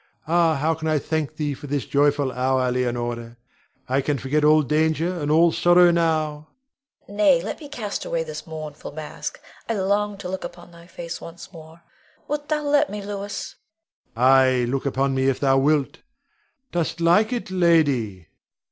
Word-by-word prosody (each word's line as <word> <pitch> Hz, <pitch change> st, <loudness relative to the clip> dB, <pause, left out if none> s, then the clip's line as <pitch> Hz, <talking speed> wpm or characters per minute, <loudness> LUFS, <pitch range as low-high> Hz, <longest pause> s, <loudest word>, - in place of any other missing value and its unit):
Ah, 165 Hz, -1 st, +3 dB
how 155 Hz, +3 st, +1 dB
can 160 Hz, 0 st, -5 dB
I 155 Hz, -1 st, +2 dB
thank 155 Hz, 0 st, -2 dB
thee 150 Hz, -2 st, -1 dB
for 145 Hz, -, -10 dB
this 140 Hz, -1 st, -2 dB
joyful 145 Hz, -1 st, +2 dB
hour, 130 Hz, 0 st, 0 dB
Leonore. 120 Hz, -1 st, -3 dB, 0.5 s
I 130 Hz, +2 st, +1 dB
can 145 Hz, +1 st, -1 dB
forget 140 Hz, +4 st, -1 dB
all 155 Hz, +1 st, +5 dB
danger 160 Hz, +4 st, +1 dB
and 145 Hz, -, -2 dB
all 165 Hz, +2 st, +5 dB
sorrow 175 Hz, +1 st, +5 dB
now. 155 Hz, -3 st, 0 dB, 0.6 s
Leonore. 205 Hz, -, -11 dB
Nay, 195 Hz, -5 st, +5 dB
let 215 Hz, -, -5 dB
me 295 Hz, -3 st, -10 dB
cast 220 Hz, -8 st, -4 dB
away -, -, -2 dB
this 475 Hz, -, -8 dB
mournful 155 Hz, -2 st, -8 dB
mask! 155 Hz, 0 st, -6 dB, 0.3 s
I 230 Hz, -, 0 dB
long 205 Hz, +1 st, 0 dB
to 190 Hz, -, -7 dB
look 190 Hz, +1 st, -5 dB
upon 175 Hz, 0 st, -9 dB
thy 170 Hz, 0 st, -16 dB
face 170 Hz, -1 st, -7 dB
once 170 Hz, +3 st, -11 dB
more. 160 Hz, 0 st, -14 dB, 0.4 s
Wilt 295 Hz, 0 st, -4 dB
thou 305 Hz, -1 st, 0 dB
let 290 Hz, 0 st, +2 dB
me, 205 Hz, -1 st, -6 dB
Louis? 200 Hz, 0 st, -5 dB, 0.6 s
Rod. 120 Hz, -, -2 dB
Ay, 130 Hz, -1 st, +5 dB
look 135 Hz, +3 st, -2 dB
upon 135 Hz, 0 st, 0 dB
me 130 Hz, 0 st, +1 dB
if 135 Hz, -, -1 dB
thou 135 Hz, -1 st, +3 dB
wilt; 145 Hz, 0 st, +1 dB, 0.7 s
dost 170 Hz, -1 st, -2 dB
like 175 Hz, +7 st, +3 dB
it, 240 Hz, -5 st, -4 dB
lady? 145 Hz, -, +2 dB
155 Hz, 175 wpm, -23 LUFS, 135-180 Hz, 0.7 s, all